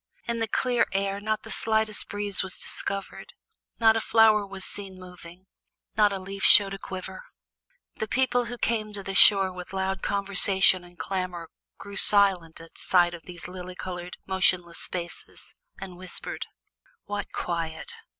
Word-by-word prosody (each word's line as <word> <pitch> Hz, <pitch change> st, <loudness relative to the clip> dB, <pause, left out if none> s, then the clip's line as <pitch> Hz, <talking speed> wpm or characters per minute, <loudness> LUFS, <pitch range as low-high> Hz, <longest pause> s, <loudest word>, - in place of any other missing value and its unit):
In 235 Hz, 0 st, -2 dB
the 225 Hz, -, 0 dB
clear 245 Hz, +2 st, +1 dB
air 195 Hz, 0 st, -1 dB
not 215 Hz, +1 st, -2 dB
the -, -, -9 dB
slightest 220 Hz, -1 st, -1 dB
breeze 205 Hz, -1 st, 0 dB
was 190 Hz, -1 st, -3 dB
discovered, 195 Hz, -1 st, -5 dB, 0.5 s
not 225 Hz, -1 st, +5 dB
a 225 Hz, -, 0 dB
flower 215 Hz, -2 st, +4 dB
was 195 Hz, -1 st, -8 dB
seen 195 Hz, -2 st, -5 dB
moving, 180 Hz, 0 st, -13 dB, 0.5 s
not 210 Hz, -1 st, +4 dB
a 195 Hz, -, -3 dB
leaf 195 Hz, +1 st, -8 dB
showed 200 Hz, -1 st, +7 dB
a 195 Hz, -, -7 dB
quiver. 190 Hz, -, -8 dB, 0.7 s
The 220 Hz, -, -3 dB
people 250 Hz, 0 st, +1 dB
who 235 Hz, -, -7 dB
had 245 Hz, -, -10 dB
come 215 Hz, -2 st, -1 dB
to 200 Hz, -1 st, -6 dB
the 195 Hz, -, -5 dB
shore 195 Hz, 0 st, +7 dB
with 180 Hz, +1 st, -10 dB
loud 190 Hz, 0 st, -2 dB
conversation 195 Hz, -2 st, +3 dB
and 175 Hz, 0 st, -17 dB
clamor 180 Hz, -4 st, -4 dB, 0.3 s
grew 200 Hz, -1 st, -9 dB
silent 190 Hz, -6 st, +5 dB
at 165 Hz, 0 st, -10 dB
sight 175 Hz, -2 st, +3 dB
of 170 Hz, -2 st, -11 dB
those 175 Hz, -1 st, -9 dB
lily 180 Hz, 0 st, -9 dB
colored, 180 Hz, -1 st, -7 dB
motionless 180 Hz, -2 st, 0 dB
spaces, 175 Hz, -1 st, -6 dB, 0.3 s
and 190 Hz, -2 st, -9 dB
whispered: 185 Hz, 0 st, -6 dB, 0.6 s
"What 205 Hz, 0 st, -5 dB
quiet! 165 Hz, -2 st, -4 dB
195 Hz, 160 wpm, -26 LUFS, 180-205 Hz, 0.7 s, showed